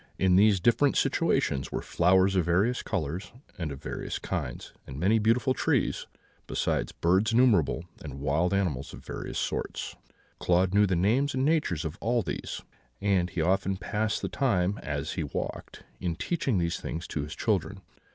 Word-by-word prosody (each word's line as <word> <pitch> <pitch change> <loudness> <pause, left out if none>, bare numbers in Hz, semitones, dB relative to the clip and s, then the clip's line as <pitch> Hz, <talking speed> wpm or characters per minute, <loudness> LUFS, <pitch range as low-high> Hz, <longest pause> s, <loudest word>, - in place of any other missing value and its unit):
In 95 -1 +3
these 100 0 +5
different 120 +8 +3
situations 65 -1 +1
were - - -3
flowers 95 +2 +3
of 90 - +3
various 95 +9 +2
colours 90 +3 -3 0.3
and 80 -4 -2
of 70 - -8
various - - -4
kinds, - - -4
and 65 +1 -7
many 105 +7 +3
beautiful 115 +4 +2
trees, - - 0 0.4
besides - - -1
birds 95 +7 +2
innumerable 105 - +3 0.2
and 70 -3 -7
wild 75 +5 +1
animals 90 -10 -1
of - - -11
various - - -5
sorts. - - -3 0.4
Claude 90 +1 +2
knew 105 0 +5
the 95 - +1
names 120 +11 +2
and 130 +1 +1
natures 145 - +1
of 80 - -5
all 120 +1 +1
these; 85 - -5 0.4
and 95 -3 +1
he 85 - -2
often 95 +3 +1
passed 105 +3 -2
the - - 0
time, 100 -7 +1
as 75 0 -3
he 85 - -2
walked, 70 - -5 0.2
in 85 -3 -2
teaching 160 - -1
these 85 -1 0
things 80 +2 -5
to 75 - -3
his 75 +3 -6
children. 100 -2 -1
95 Hz, 170 wpm, -28 LUFS, 85-110 Hz, 0.4 s, these